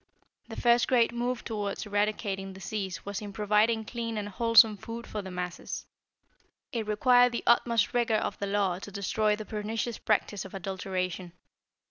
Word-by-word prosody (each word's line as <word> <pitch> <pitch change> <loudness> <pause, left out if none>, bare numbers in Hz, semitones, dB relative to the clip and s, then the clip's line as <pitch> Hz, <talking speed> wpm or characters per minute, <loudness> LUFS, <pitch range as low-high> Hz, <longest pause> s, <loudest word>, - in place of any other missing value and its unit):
The - - -7
first 240 0 +4
great 240 -3 +3
move 245 +1 -2
toward 210 -3 -3
eradicating 205 -2 -1
disease 190 0 -5
was 200 +1 -4
in 205 -1 -6
providing 215 +2 +2
clean 230 -1 -4
and 205 -1 -3
wholesome 225 0 +5
food 230 +3 -7
for 210 - -5
the 190 - -8
masses. 180 -1 -5 0.9
It 225 -3 -3
required 245 +3 +4
the 235 - -2
utmost 235 -3 +3
rigor 235 -2 +2
of 215 - -2
the 200 - -2
law 195 -3 0
to 200 - -8
destroy 210 +2 0
the 215 0 -7
pernicious 220 +2 -3
practice 205 -2 0
of 195 - -10
adulteration. 185 -2 -4
210 Hz, 160 wpm, -29 LUFS, 195-230 Hz, 0.9 s, wholesome